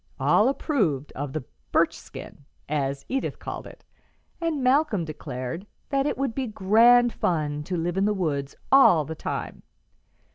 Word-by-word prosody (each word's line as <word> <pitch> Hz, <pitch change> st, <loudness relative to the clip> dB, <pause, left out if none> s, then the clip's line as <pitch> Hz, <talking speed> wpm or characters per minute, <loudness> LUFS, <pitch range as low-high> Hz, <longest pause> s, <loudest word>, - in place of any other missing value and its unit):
All 220 Hz, +5 st, +4 dB
approved 195 Hz, -, -1 dB
of 145 Hz, 0 st, -5 dB
the 155 Hz, -1 st, -4 dB, 0.3 s
"birchskin," -, -, -2 dB, 0.3 s
as 140 Hz, -2 st, -2 dB
Edith 270 Hz, +1 st, -2 dB
called -, -, -7 dB
it, -, -, -15 dB, 0.6 s
and 320 Hz, -5 st, -1 dB
Malcolm 255 Hz, -, +2 dB
declared 150 Hz, +3 st, -6 dB, 0.2 s
that 275 Hz, 0 st, +1 dB
"it -, -, -2 dB
would 270 Hz, -3 st, -1 dB
be 265 Hz, 0 st, -2 dB
grand 230 Hz, +4 st, +5 dB
fun 150 Hz, -4 st, -1 dB
to 180 Hz, +1 st, -2 dB
live 175 Hz, +2 st, -2 dB
in 195 Hz, -, +2 dB
the 210 Hz, -, +2 dB
woods 145 Hz, -7 st, -2 dB, 0.2 s
all 180 Hz, -, +6 dB
the 160 Hz, -, -5 dB
time." 160 Hz, -, -5 dB
190 Hz, 150 wpm, -25 LUFS, -, 0.6 s, all